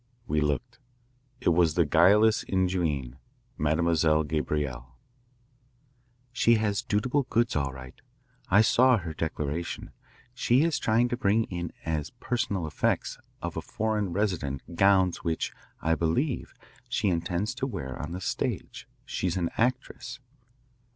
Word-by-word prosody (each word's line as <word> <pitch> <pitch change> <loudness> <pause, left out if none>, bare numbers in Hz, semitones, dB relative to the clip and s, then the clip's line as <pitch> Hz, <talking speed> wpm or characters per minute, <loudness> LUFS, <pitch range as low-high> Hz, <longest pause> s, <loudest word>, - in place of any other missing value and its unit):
We 75 -6 0
looked. 75 - -2 0.6
It - - +3
was 85 -2 +3
the 85 - +4
guileless 105 +9 +5
ingenue, 90 -9 0 0.4
Mademoiselle 80 0 +2
Gabrielle. 70 -5 -3 1.4
"She 115 -1 +4
has 105 -2 0
dutiable 125 +6 0
goods, 115 +1 +1
all 70 -2 0
right. 65 -1 -10 0.6
I 100 +3 +6
saw 125 +3 +5
her 85 -5 -5
declaration. 80 +1 -3 0.4
She 125 +2 +3
is 165 -2 +1
trying 115 +2 +2
to 120 - -2
bring 110 -1 +2
in 85 -2 -3
as 80 -3 -2
personal 100 -7 -1
effects 75 -3 -1 0.2
of - - -4
a - - -2
foreign 105 -3 -1
resident 85 -6 -2
gowns 95 -1 +4
which, 80 -1 -1 0.3
I 80 - +3
believe, 85 - -1 0.3
she 115 -4 +1
intends 90 +5 -1
to 130 +1 -3
wear 65 - -5
on 75 - -5
the 90 +2 -5
stage. - - -3 0.2
She's 90 -1 -2
an 85 -2 -1
actress." 125 +2 -2
90 Hz, 130 wpm, -28 LUFS, 80-110 Hz, 1.4 s, I